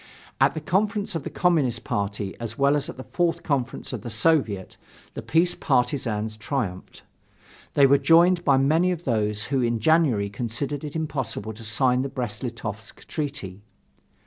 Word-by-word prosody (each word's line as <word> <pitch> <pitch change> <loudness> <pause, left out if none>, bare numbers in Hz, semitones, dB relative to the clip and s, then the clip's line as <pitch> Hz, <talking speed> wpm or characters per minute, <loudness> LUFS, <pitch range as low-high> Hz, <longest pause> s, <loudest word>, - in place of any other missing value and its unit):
At - - +4
the 155 - -3
conference 205 +5 0
of 165 - -2
the - - -4
Communist 150 -10 +1
party 100 -1 -3
as 115 -1 -5
well 140 +1 +3
as 145 +2 -2
at - - -8
the 130 - -7
Fourth 175 +2 -1
Conference 135 -3 -2
of 120 - -4
the 120 - -6
Soviet, 110 - +1 0.4
the - - -5
peace 170 +2 +2
partisans 120 -5 0
triumphed. 110 -6 -4 0.7
They 140 - +6
were 140 +1 +5
joined 175 +2 +5
by 140 -4 +4
many 160 +7 +3
of 175 -2 -4
those 105 -3 0
who 135 - +2
in 120 -1 0
January 135 -6 +3
considered 120 +7 -3
it 150 0 -6
impossible 135 -9 -3
to 110 +2 -11
sign 125 +4 +2
the 135 - -3
Brest 120 -6 -4
Litovsk 115 -3 -6
treaty. 140 - -5
130 Hz, 170 wpm, -25 LUFS, 110-155 Hz, 0.7 s, They